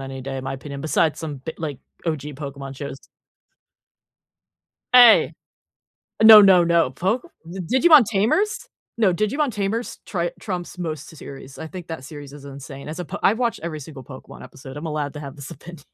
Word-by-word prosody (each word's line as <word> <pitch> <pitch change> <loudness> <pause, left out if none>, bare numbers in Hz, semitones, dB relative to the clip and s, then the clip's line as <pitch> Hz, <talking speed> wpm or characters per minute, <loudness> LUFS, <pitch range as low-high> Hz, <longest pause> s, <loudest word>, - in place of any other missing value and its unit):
any 135 0 -7
day, 135 +1 -5
in 130 - -7
my 135 - -3
opinion, 140 +1 -8
besides 155 0 +1
some 150 -3 -5
bi 160 +5 -7
like, 150 -5 -4 0.3
OG 155 -3 -1 0.2
Pokemon 140 -2 -7
shows. 140 -1 -6 2.0
Hey! 245 -3 +7 0.9
Uh, - - +4
no, 220 -1 +11
no, 190 -3 +6
no. 170 -5 +2
Poke 195 - -2 0.2
th 180 +2 -6
Digimon 305 0 +7
Tamers? 385 - 0 0.3
No, 210 -6 +3
Digimon 250 - 0
Tamers 210 +4 -3
try 175 -3 -2
trumps 180 -3 -5
most 160 -3 -5
s 160 - -14
series. 135 -1 -11
I 160 - -7
think 180 0 -9
that 160 -5 -7
series 145 -1 -10
is 145 -1 -12
insane 140 0 -9
as 155 - -6
a 180 - -4
po 190 +5 -7
I've 215 +3 +3
watched 235 -4 -1
every 165 -2 -4
single 145 -2 -10
Pokemon 130 +1 -12
episode, 135 0 -11
I'm 155 +3 -6
allowed 150 -2 -3
to 150 - -7
have 140 0 -9
this 140 -1 -9
opinion. 160 +1 -12
160 Hz, 190 wpm, -22 LUFS, 140-195 Hz, 2.0 s, no